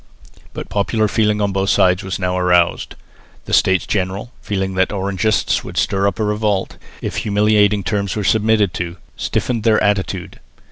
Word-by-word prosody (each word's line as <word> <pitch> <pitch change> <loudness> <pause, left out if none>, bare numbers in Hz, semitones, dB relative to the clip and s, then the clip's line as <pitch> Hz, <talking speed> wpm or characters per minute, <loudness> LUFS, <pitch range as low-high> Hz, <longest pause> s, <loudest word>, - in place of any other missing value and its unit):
But - - -6
popular 110 +2 0
feeling 105 -1 +1
on 100 -1 +1
both 95 0 -1
sides 90 +1 +3
was 95 -2 -3
now 90 -1 -1
aroused. 90 -1 +1 0.5
The - - -6
States 95 -1 +3
General, 100 +4 -2
fearing 95 -2 -2
that 95 0 +1
the - - -5
Orangists 100 +2 0
would - - -9
stir 100 0 +1
up 100 - -2
a - - +1
revolt, 105 -2 -1 0.3
if - - -3
humiliating 105 -1 +2
terms 100 +1 -2
were 105 - -2
submitted 105 -1 +2
to, 85 0 -4 0.2
stiffened 120 -3 -2
their 110 0 +3
attitude. 95 -2 -1
100 Hz, 170 wpm, -18 LUFS, 95-105 Hz, 0.5 s, sides